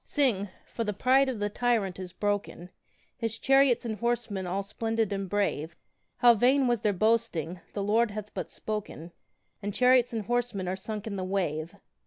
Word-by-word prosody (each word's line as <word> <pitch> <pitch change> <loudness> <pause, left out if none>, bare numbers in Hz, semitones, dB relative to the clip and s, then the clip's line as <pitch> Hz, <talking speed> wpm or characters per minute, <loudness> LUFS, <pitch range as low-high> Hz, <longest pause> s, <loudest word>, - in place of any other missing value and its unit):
Sing 230 -9 +1 0.2
for 230 - -4
the 210 -1 -2
pride 265 +5 +4
of 255 - -3
the 205 0 -1
tyrant 210 -4 0
is 185 -1 -6
broken, 205 -3 -3 0.5
His 230 -1 -3
chariots 270 -2 +4
and 220 -3 -3
horsemen 230 -5 -1
all 195 +3 -1
splendid 225 +1 -1
and 195 -1 -3
brave, 170 -5 -1 0.4
How 240 -1 +7
vain 260 +5 +3
was 240 -3 +1
their 210 - +2
boasting! 190 -5 0
the 200 - -2
Lord 225 +3 +3
hath 210 0 -7
but - - -4
spoken, 210 -6 -5 0.5
And 205 -1 -4
chariots 250 -1 +4
and 225 -3 -3
horsemen 240 -5 -1
are 185 - -1
sunk 210 +2 -6
in 205 -3 -4
the 185 - -2
wave. 175 -4 -2
210 Hz, 180 wpm, -28 LUFS, 195-235 Hz, 0.5 s, How